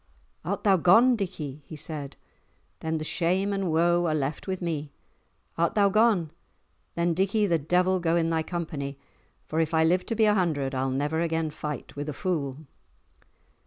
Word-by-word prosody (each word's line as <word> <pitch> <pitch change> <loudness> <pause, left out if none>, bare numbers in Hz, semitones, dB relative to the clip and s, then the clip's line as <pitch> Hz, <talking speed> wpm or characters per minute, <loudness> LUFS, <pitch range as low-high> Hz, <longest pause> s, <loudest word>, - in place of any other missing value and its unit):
"Art - - -3
thou 195 -3 +5
gone, 225 +9 +5
Dickie?" 155 - -5
he 155 - -8
said. 150 -2 -6 0.6
"Then 160 0 -2
the 155 - -4
shame 185 +5 +1
and 195 -3 -1
woe 175 +2 +3
are 155 - +1
left 145 +3 -3
with 190 -1 -2
me. 155 -4 -3 0.7
Art 170 0 +1
thou 200 -2 +4
gone? 205 -6 +3 0.6
Then, 170 0 +1
Dickie, 195 +4 +1
the 170 -4 +2
devil 180 +5 +2
go 170 -1 +1
in 165 -1 +1
thy 160 -1 +1
company, 155 -5 -4 0.5
for 160 - -2
if 165 0 0
I 160 - +4
live 180 +3 +2
to 230 - -1
be 220 0 +4
a 210 - +4
hundred, 155 -8 0
I'll 130 0 0
never 145 +5 -1
again 165 -2 -1
fight 150 -1 -6
with 145 +1 -4
a - - -3
fool." 150 -4 -3
165 Hz, 180 wpm, -27 LUFS, 150-185 Hz, 0.7 s, thou